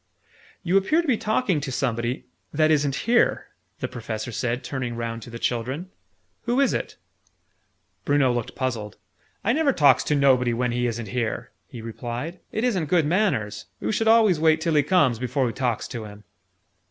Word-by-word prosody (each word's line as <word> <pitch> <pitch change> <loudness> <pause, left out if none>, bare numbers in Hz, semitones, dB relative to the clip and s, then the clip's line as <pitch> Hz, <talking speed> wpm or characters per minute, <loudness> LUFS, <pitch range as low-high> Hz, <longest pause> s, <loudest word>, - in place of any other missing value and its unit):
"You 180 +2 +3
appear 310 - +2
to - - -6
be 260 - +4
talking 210 - 0
to 140 -1 -4
somebody 120 -1 -2 0.3
that 155 +1 +3
isn't 145 -3 +2
here," 235 +2 +2 0.3
the - - -1
Professor 110 -1 -5
said, 120 +2 -2
turning 125 -3 -4
round 115 0 -4
to 120 - -10
the 115 - -7
children. 130 +10 -2 0.5
"Who 240 +3 +1
is 275 - +3
it?" - - -4 1.1
Bruno 140 -3 +3
looked 120 -2 -4
puzzled. 115 -6 -3 0.5
"I 230 - +2
never 300 0 +3
talks 145 - +4
to 150 - +1
nobody 130 -4 +3
when 125 0 0
he 120 0 0
isn't 115 -2 -4
here!" 120 -1 -3 0.2
he 115 - -9
replied. 120 +9 -5
"It 220 - -2
isn't 200 -10 +1
good 170 -3 +3
manners. 155 - 0 0.2
Oo - - 0
should 225 +1 0
always 220 -7 +5
wait 160 0 +4
till 160 +1 0
he 150 - +5
comes, 145 - +2
before 125 +1 0
oo - - -1
talks 120 -2 -2
to 115 -4 -6
him!" 105 0 -12
135 Hz, 180 wpm, -24 LUFS, 120-180 Hz, 1.1 s, always